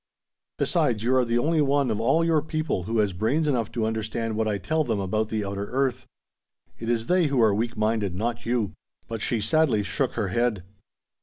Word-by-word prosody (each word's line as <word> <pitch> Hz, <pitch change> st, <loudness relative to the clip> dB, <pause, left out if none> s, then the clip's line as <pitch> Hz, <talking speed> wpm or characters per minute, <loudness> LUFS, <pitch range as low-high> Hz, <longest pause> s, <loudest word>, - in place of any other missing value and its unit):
Besides, 110 Hz, -3 st, +1 dB
you 125 Hz, +3 st, +2 dB
are 130 Hz, -, +4 dB
the 120 Hz, 0 st, 0 dB
only 155 Hz, +6 st, +2 dB
one 140 Hz, -3 st, +2 dB
of 105 Hz, -, -1 dB
all 140 Hz, +8 st, +3 dB
your 160 Hz, -2 st, +3 dB
people 155 Hz, -, -2 dB
who 115 Hz, +3 st, -1 dB
has 105 Hz, -3 st, +2 dB
brains 135 Hz, -, 0 dB
enough 120 Hz, -7 st, 0 dB
to 115 Hz, -2 st, 0 dB
understand 110 Hz, 0 st, -2 dB
what 110 Hz, 0 st, 0 dB
I 105 Hz, -2 st, 0 dB
tell 155 Hz, +12 st, 0 dB
them 115 Hz, -7 st, -1 dB
about 110 Hz, +3 st, -1 dB
the 110 Hz, -2 st, -2 dB
outer 100 Hz, 0 st, -3 dB
earth. 130 Hz, -1 st, -1 dB, 0.7 s
It 115 Hz, -, -4 dB
is 115 Hz, -1 st, 0 dB
they 180 Hz, 0 st, +3 dB
who 140 Hz, -3 st, 0 dB
are 110 Hz, -3 st, +5 dB
weak 115 Hz, +3 st, -2 dB
minded; 105 Hz, -3 st, 0 dB
not 115 Hz, +4 st, -2 dB
you!" 115 Hz, -7 st, -1 dB, 0.3 s
But 115 Hz, -1 st, -5 dB
she 115 Hz, -, 0 dB
sadly 135 Hz, -2 st, +2 dB
shook 135 Hz, +5 st, -1 dB
her 105 Hz, -4 st, -1 dB
head. 110 Hz, -2 st, 0 dB
115 Hz, 210 wpm, -25 LUFS, 110-135 Hz, 0.7 s, are